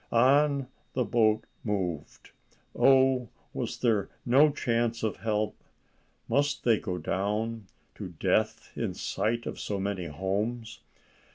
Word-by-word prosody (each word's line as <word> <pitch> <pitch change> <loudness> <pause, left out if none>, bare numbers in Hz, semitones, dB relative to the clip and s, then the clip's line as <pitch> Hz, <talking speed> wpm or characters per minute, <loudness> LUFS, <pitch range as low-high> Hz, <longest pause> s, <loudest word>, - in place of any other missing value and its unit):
On, 115 0 +5 0.4
on - - -14 0.3
the 125 -2 0
boat 110 -2 +3 0.2
moved. 90 -8 -3 0.4
Oh, 130 -3 +4 0.2
was - - -3
there 110 -5 +1 0.2
no 140 +5 +6
chance 115 -4 0
of 110 - -1
help? 110 -1 -1 0.7
Must 145 +4 +1
they 115 -3 +4
go 90 -3 -3
down, 105 +5 -2 0.3
to - - -7
death - - 0
in - - -2
sight 115 +2 -1
of - - -5
so 100 -2 -3
many 95 -2 -2
homes? 105 +8 -3
110 Hz, 125 wpm, -28 LUFS, 100-120 Hz, 0.7 s, no